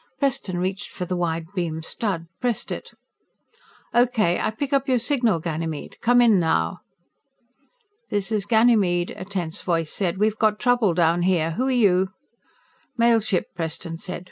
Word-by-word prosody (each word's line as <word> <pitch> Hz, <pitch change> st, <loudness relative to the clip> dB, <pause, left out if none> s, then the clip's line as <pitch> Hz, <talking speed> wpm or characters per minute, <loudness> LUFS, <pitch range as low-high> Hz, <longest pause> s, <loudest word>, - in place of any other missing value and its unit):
Preston 270 Hz, -9 st, -1 dB
reached 185 Hz, +2 st, -3 dB
for 180 Hz, -, -5 dB
the 180 Hz, -, -3 dB
wide 165 Hz, -2 st, -1 dB
beam 165 Hz, -4 st, -3 dB
stud, 185 Hz, -2 st, -2 dB
pressed 245 Hz, -3 st, -2 dB
it. -, -, -7 dB, 1.0 s
"Okay, 235 Hz, -7 st, +3 dB
I -, -, 0 dB
pick 275 Hz, +6 st, -4 dB
up 275 Hz, 0 st, +2 dB
your 255 Hz, -, +4 dB
signal, 240 Hz, -, +1 dB
Ganymede. 160 Hz, -1 st, -4 dB
Come 245 Hz, +1 st, +4 dB
in, 220 Hz, -5 st, +5 dB
now!" 90 Hz, -, 0 dB, 1.3 s
"This 205 Hz, 0 st, -1 dB
is 205 Hz, -2 st, 0 dB
Ganymede," 210 Hz, -6 st, +3 dB
a -, -, -7 dB
tense 180 Hz, -5 st, -4 dB
voice 165 Hz, -3 st, -1 dB
said. 185 Hz, -3 st, -1 dB
"We've 215 Hz, +2 st, +1 dB
got 215 Hz, -1 st, +3 dB
trouble 245 Hz, -8 st, +2 dB
down 170 Hz, 0 st, +3 dB
here. 175 Hz, -3 st, +1 dB
Who 255 Hz, +11 st, -1 dB
are -, -, +1 dB
you?" 190 Hz, -7 st, +3 dB, 0.9 s
"Mail 235 Hz, -1 st, +4 dB
ship," 205 Hz, -4 st, -1 dB
Preston 165 Hz, 0 st, -4 dB
said. 180 Hz, +3 st, -6 dB
190 Hz, 160 wpm, -23 LUFS, 170-230 Hz, 1.3 s, in